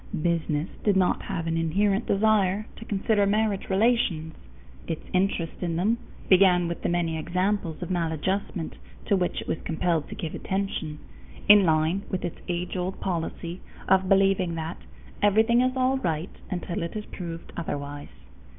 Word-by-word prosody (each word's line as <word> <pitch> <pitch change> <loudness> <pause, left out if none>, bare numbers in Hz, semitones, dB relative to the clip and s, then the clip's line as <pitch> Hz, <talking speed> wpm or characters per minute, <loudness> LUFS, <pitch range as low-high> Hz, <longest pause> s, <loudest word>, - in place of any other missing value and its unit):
Business 165 -2 0 0.2
did 205 -3 +3
not 185 -1 +2
have 185 -4 -3
an 165 0 0
inherent 195 +6 +1
desire 205 -1 +2
to 225 - -9
consider 205 0 +1
marriage 210 -1 0
relations. 190 -6 +2 0.5
Its 160 - -4
interest 185 -3 0
in 170 -2 -1
them 215 +7 +1 0.3
began 180 -2 +5
with 170 - -4
the - - 0
many 170 -2 0
examples 180 0 -1
of 175 - -5
maladjustment 175 +1 -2 0.3
to 200 - +3
which 180 -2 0
it - - -10
was - - -2
compelled 165 -1 0
to - - -6
give 160 - -5
attention, 190 -6 -3 0.5
in 205 -1 +8
line 160 +4 +2
with 185 -2 -2
its 175 - -5
age 175 +1 -2
old 185 +1 -3
policy 170 0 -3 0.3
of 190 0 +3
believing 195 -3 +3
that 160 +1 -4 0.4
"everything 220 +4 +4
is 255 +1 +1
all 260 +1 +2
right 165 -3 -2
until 175 -2 -3
it 170 +4 -4
is 210 -1 -4
proved 170 -2 -7
otherwise." 145 -3 -5
180 Hz, 160 wpm, -26 LUFS, 165-200 Hz, 0.5 s, in